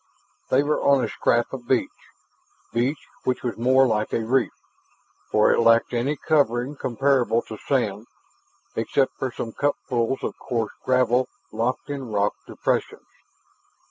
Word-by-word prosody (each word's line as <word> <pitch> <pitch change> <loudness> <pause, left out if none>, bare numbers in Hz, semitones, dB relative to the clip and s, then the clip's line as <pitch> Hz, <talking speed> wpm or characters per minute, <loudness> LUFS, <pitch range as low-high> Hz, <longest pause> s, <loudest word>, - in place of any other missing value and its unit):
They 135 +2 +4
were 150 +1 0
on 140 -2 +4
a - - 0
scrap 120 +2 +1
of 125 -3 -7
beach 130 -1 +1 0.8
beach 125 +6 0 0.2
which 130 - -1
was 120 -4 -2
more 130 +4 +4
like 110 -3 0
a - - +1
reef, 130 +1 +2 0.8
for 105 - +4
it - - +2
lacked 115 +1 +4
any 125 +5 0
covering 135 -3 +1
comparable 130 -2 +1
to 110 - -9
sand 115 -5 0 0.7
except 135 -1 0
for 130 - -2
some 115 -2 -5
cupfuls 130 -3 -1
of - - -4
coarse 115 -4 -2
gravel 125 0 +2 0.2
locked 120 +5 -2
in 135 -5 -5
rock 100 0 +1
depressions. - - -2
125 Hz, 140 wpm, -24 LUFS, 115-135 Hz, 0.8 s, They